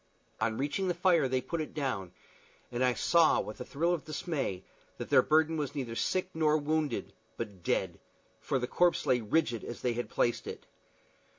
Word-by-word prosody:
On 110 0 0
reaching 145 +8 -1
the 175 - 0
fire 175 -5 +3
they 130 0 0
put 160 +6 -3
it 155 - -7
down, 125 - -2 0.6
and 120 +1 0
I 125 -1 +3
saw, 170 -2 +4
with 105 +4 -5
a - - -2
thrill 170 +7 0
of 170 - -2
dismay, 145 - -3 0.3
that - - -7
their - - +7
burden 160 +1 +3
was 145 -1 -3
neither 125 -5 -3
sick 185 +8 0
nor 155 -1 +3
wounded, 155 0 -1 0.2
but 100 -5 -6
dead, - - -1 0.4
for 135 - -1
the 125 - -1
corpse 175 +7 +2
lay 125 -1 +3
rigid 120 0 0
as 120 - -7
they 125 - +1
had 120 +1 -4
placed 120 - 0
it. - - -7
145 Hz, 190 wpm, -31 LUFS, 120-160 Hz, 0.6 s, their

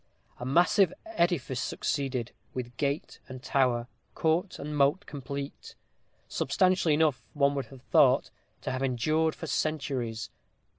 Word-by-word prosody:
A 125 - -5
massive 175 +5 +4
edifice 170 - 0
succeeded, 130 -4 -2 0.2
with 120 -1 -5
gate 140 +1 -2
and 130 0 -8
tower, 125 -4 +2 0.3
court 170 +4 +1
and 150 +1 -5
moat 145 +7 +3
complete; 140 0 -6 0.5
substantial 185 -4 +2
enough, 150 -4 +3
one 140 -1 +3
would 140 -1 -3
have 135 -2 -14
thought, - - +4 0.3
to - - -3
have 130 0 -3
endured 155 +5 +1
for - - -6
centuries. 130 - -2
140 Hz, 130 wpm, -29 LUFS, 130-160 Hz, 0.5 s, massive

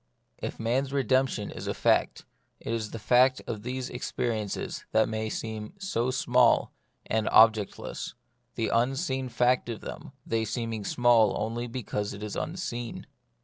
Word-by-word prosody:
If - - -5
man's 130 +4 0
redemption 130 -5 +1
is - - -7
a - - -1
fact, - - +2 0.3
it - - -4
is 110 -2 -2
the - - -6
fact 130 +4 +4
of 105 -3 -4
these 125 +2 -3
experiences 115 -4 -3
that 110 0 +4
may 110 0 -2
seem 110 +4 -5
so 155 -12 -1
small 125 -2 +3 0.3
and 110 -1 0
ob 110 0 +8
jectless; 105 -3 -6 0.4
the 115 - 0
unseen 130 +2 0
fact 125 +1 +2
of 115 -3 -5
them, - - -8
they 115 -1 0
seem 115 +1 -3
ing 105 -2 -4
small 120 -2 +4
only 115 +3 -2
because 115 -4 -3
it 100 - -8
is 105 - -4
unseen. 120 -9 -4
115 Hz, 155 wpm, -28 LUFS, 110-130 Hz, 0.4 s, ob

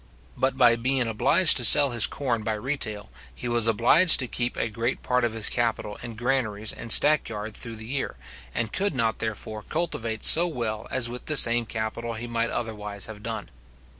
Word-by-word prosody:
But 130 +1 -1
by 120 -3 +4
being 130 +1 -1
obliged 135 +10 +3
to 125 - +2
sell 140 +4 +8
his 120 -2 +3
corn 120 -5 -3
by 110 0 -3
retail, 110 -3 -3 0.2
he 125 - -7
was 120 -1 +2
obliged 120 - +5
to 130 - -2
keep 120 +1 -4
a - - -1
great 115 +3 -4
part 125 -1 0
of 120 -2 -1
his 110 -2 +2
capital 115 -3 -2
in 120 -1 -8
his - - -16
granaries 110 -4 -2
and 115 - -7
stack 150 -3 +4
yard 105 -1 -7
through 115 -1 -3
the 110 0 -10
year, 135 +4 -4 0.4
and 110 - -4
could 195 -5 -2
not 115 -3 -1
therefore 110 -1 -6
cultivate 115 -7 -4
so 170 +2 +6
well 115 -8 -5
as 130 -2 0
with 125 +1 -9
the 155 - +3
same 115 -2 +6
capital 115 +1 -5
he 115 +2 -6
might 115 0 -3
otherwise 105 -3 -5
have 110 -2 -11
done. 110 -1 -6
115 Hz, 200 wpm, -24 LUFS, 110-130 Hz, 0.4 s, sell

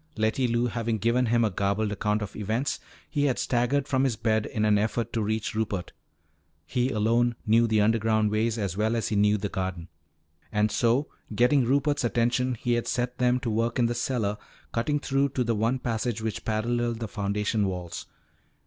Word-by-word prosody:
Letty 110 +4 +1
Lou 120 +1 +1
having 115 -1 -1
given 115 +4 +1
him 115 0 +3
a 105 - 0
garbled 100 +3 0
account 105 +1 0
of 100 - -8
events, 110 +6 -1 0.3
he 145 -2 0
had 130 -3 +1
staggered 130 +3 +1
from 130 -1 +1
his 130 -4 +1
bed 110 -1 0
in 105 -1 -1
an 105 -1 +4
effort 110 +2 -1
to 115 - 0
reach 110 +1 -1
Rupert. 105 -4 -2 0.7
He 125 +1 0
alone 120 +1 +2
knew 115 +2 +4
the 110 -1 +3
underground 110 0 +2
ways 110 +2 0
as 100 -5 -2
well 110 +3 +1
as 115 - -1
he 110 - -1
knew 105 +1 +4
the 100 0 -2
garden. 95 -3 -4 0.6
And 105 0 +1
so 115 -1 +3
once 145 +3 -1 0.3
getting 125 +3 +4
Rupert's 140 +3 +1
attention, 120 +2 +1
he 120 +2 -1
had 120 0 -1
set 125 0 -2
them 125 0 +3
to 120 - -2
work 115 +2 0
in 120 - +3
the 120 - 0
cellar 115 -4 -1 0.4
cutting 145 +6 0
through 140 0 +1
to 125 - +2
the 115 -1 0
one 115 +4 +1
passage 120 -2 -2
which 110 -1 -4
paralleled 115 +1 -1
the 115 - -3
foundation 105 0 -1
walls. 90 -2 -5
115 Hz, 195 wpm, -27 LUFS, 105-120 Hz, 0.7 s, an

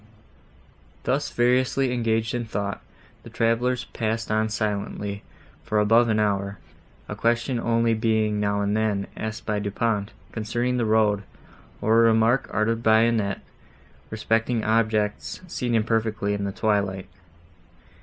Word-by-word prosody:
Thus - - 0
variously 125 +1 +2
engaged 115 -1 0
in 120 -1 -1
thought, 100 -2 -3 0.4
the - - -12
travellers 120 +2 0
passed 115 0 -2
on 110 0 +1
silently, 105 -1 -3 0.4
for 110 - -1
above 115 +3 +4
an 110 -1 +2
hour, 100 -1 0 0.5
a 105 - -5
question 120 +3 0
only 115 0 +2
being, 110 -2 +1
now 100 0 0
and 100 +1 0
then, 105 -2 0
asked 110 -1 -5
by 105 -1 -1
Du 100 0 -3
Pont, 105 -1 -1 0.2
concerning 120 +3 -1
the 120 - +1
road, 105 -2 +3 0.6
or 110 +1 +4
a 115 - +6
remark 115 +4 +2
uttered 115 +2 0
by 110 -1 +5
Annette, 110 -4 +1 0.7
respecting 115 +1 0
objects, 110 -2 0
seen 125 -8 -2
imperfectly 110 -2 0
in 100 -1 -2
the 100 - -2
twilight. 100 -3 -1
110 Hz, 135 wpm, -24 LUFS, 105-115 Hz, 0.7 s, a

